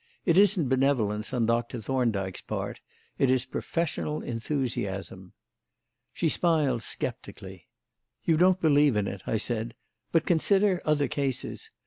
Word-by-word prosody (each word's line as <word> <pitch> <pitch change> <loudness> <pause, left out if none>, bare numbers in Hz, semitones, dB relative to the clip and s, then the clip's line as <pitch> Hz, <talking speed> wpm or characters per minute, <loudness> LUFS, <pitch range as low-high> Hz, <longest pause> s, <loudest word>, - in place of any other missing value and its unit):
It 170 - +3
isn't 195 -5 +4
benevolence 125 -6 +1
on 125 -3 +1
Doctor 120 +1 0
Thorndyke's 110 -6 -1
part; - - -5 0.4
it 135 - +3
is 130 0 +2
professional 155 -2 -3
enthusiasm." 115 -7 -3 0.8
She 170 - -1
smiled 150 -7 +2
sceptically. - - -7 0.6
"You 165 - +3
don't 185 +3 +4
believe 145 - +4
in 105 - +1
it," 100 -1 -5
I 110 - +1
said; 115 +1 -3 0.4
"but 165 - +2
consider 190 +2 +2
other 150 -2 +2
cases. 135 -1 -3
130 Hz, 125 wpm, -27 LUFS, 115-160 Hz, 0.8 s, isn't